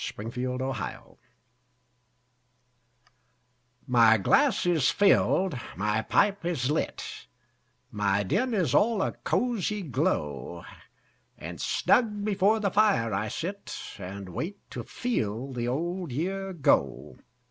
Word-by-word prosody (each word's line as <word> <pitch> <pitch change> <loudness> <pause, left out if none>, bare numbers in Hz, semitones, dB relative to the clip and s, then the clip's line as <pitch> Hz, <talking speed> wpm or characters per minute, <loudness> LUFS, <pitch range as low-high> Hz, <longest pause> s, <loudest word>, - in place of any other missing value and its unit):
The - - -4
Passing 120 +3 -4
of 125 0 -2
the 130 +1 -3
Year - - -5 2.9
My 115 -4 +5
glass 260 - +3
is 165 -6 +3
filled, 190 -6 +3 0.2
my 105 +2 0
pipe 200 - +2
is 150 -6 -1
lit, 155 - -3 0.6
My 100 -1 +1
den 230 - 0
is 170 - +1
all 220 -2 +3
a - - -1
cosy 210 -4 -1
glow; 130 - -2 0.7
And - - -7
snug 210 -4 +2
before 210 +1 +2
the 200 -3 0
fire 200 - +3
I 100 +3 -1
sit, 185 - -5 0.2
And 95 0 -7
wait 180 - -6
to - - -5
FEEL 130 - -3
the 120 -1 -2
old 170 +5 -2
year 190 +8 -2
go. 100 - +1
160 Hz, 120 wpm, -27 LUFS, -, 2.9 s, My